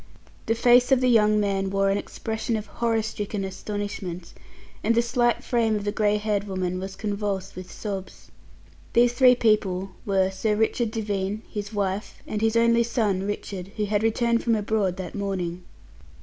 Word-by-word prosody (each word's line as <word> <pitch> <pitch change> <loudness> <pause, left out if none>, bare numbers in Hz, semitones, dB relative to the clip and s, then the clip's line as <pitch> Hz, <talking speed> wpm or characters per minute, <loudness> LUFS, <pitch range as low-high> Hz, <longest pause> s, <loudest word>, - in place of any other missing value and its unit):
The 225 - +2
face 245 +2 +5
of 265 - +6
the 255 0 +2
young 215 -2 +4
man 195 -2 0
wore 195 0 +2
an 200 - +1
expression 220 +2 -3
of 215 - -5
horror 230 -2 0
stricken 210 -2 -4
astonishment, 190 -3 -5 0.5
and 230 +2 +2
the 235 - +5
slight 240 0 +1
frame 230 -3 +1
of 205 - -2
the 205 - 0
grey 210 0 +2
haired 210 -1 -1
woman 185 -2 -2
was 190 +1 -6
convulsed 200 -2 -3
with 185 0 -8
sobs. 195 -3 -7 0.6
These 240 0 +4
three 250 0 +6
people 195 -5 +1
were 190 -2 +1
Sir 210 +2 0
Richard 220 +2 +1
Devine, 210 -1 -2
his 205 0 -5
wife, 200 -1 -3
and 215 - -3
his 225 0 +2
only 235 0 +4
son 210 -5 0
Richard, 200 -2 -5
who 210 - 0
had 205 0 0
returned 230 +1 +1
from 230 -2 +2
abroad 205 -3 0
that 185 -3 -6
morning. 185 -3 -3
210 Hz, 175 wpm, -25 LUFS, 195-225 Hz, 0.6 s, of